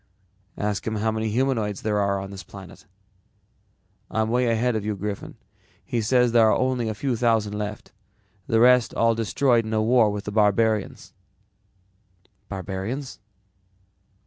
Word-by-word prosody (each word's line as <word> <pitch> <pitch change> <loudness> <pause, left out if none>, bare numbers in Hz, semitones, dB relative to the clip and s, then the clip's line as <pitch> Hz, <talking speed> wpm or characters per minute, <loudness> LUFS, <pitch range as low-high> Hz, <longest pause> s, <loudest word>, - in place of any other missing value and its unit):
"Ask 105 0 -2
him 110 - -1
how 110 +1 0
many 110 0 -2
humanoids 115 -4 -1
there 105 -1 0
are 100 -1 0
on 95 0 -7
this 95 -1 -8
planet." 95 +2 -13 1.2
"I'm 110 0 -1
way 125 +1 +2
ahead 115 +1 +1
of 110 - -2
you, 105 0 -2
Griffin. 100 +1 -6 0.5
He 120 - -1
says 125 +2 +2
there 115 -1 +5
are - - +3
only 125 -3 0
a 110 - -4
few 130 +3 -1
thousand 110 -3 +1
left. 105 0 -6 0.6
The 115 - +2
rest 125 0 +5
were - - -4
all 115 0 +4
destroyed 115 +2 +1
in 110 0 -5
a 110 - +2
war 115 -1 +4
with 105 0 -4
the 105 - -5
barbarians." 105 0 +1 1.4
"Barbarians?" 100 +8 -5
110 Hz, 155 wpm, -24 LUFS, 105-120 Hz, 1.4 s, there